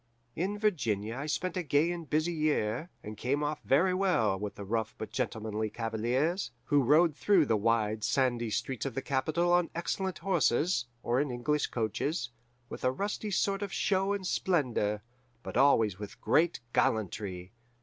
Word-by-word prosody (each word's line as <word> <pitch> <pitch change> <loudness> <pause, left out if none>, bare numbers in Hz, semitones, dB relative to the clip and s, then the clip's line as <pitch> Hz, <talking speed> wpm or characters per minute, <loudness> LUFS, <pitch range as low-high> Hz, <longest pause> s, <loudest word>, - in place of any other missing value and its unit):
"In 195 +5 -1
Virginia 115 - 0
I 140 +3 -4
spent 185 +4 -2
a 180 - 0
gay 155 +1 +2
and 170 -3 -6
busy 155 +3 +1
year, 150 -3 0
and 105 +1 -7
came 140 +6 -1
off 150 0 -2
very 180 +7 +3
well 180 - +2
with 105 0 -5
the 100 - -7
rough 110 +2 -2
but 110 - -6
gentlemanly 110 -1 -2
cavaliers, 120 - -1
who 145 +3 +3
rode 150 +4 +4
through 185 -2 +4
the 115 - +2
wide, 110 0 +1
sandy 120 -1 +1
streets 130 +4 -2
of 130 - -6
the 135 - -2
capital 155 +6 +1
on 175 -1 +3
excellent 190 +2 -2
horses, 165 -5 +1 0.2
or 120 +3 +2
in 145 - -1
English 125 +5 0
coaches, 120 - -2 0.4
with - - -8
a 130 - +4
rusty 205 +7 -3
sort 195 +1 0
of 200 -2 -3
show 195 0 +1
and 200 -2 -2
splendour, 120 - 0 0.4
but - - -7
always 115 -7 +4
with 105 -1 -8
great 170 -4 +2
gallantry. 95 -3 -1
135 Hz, 170 wpm, -30 LUFS, 110-175 Hz, 0.4 s, rode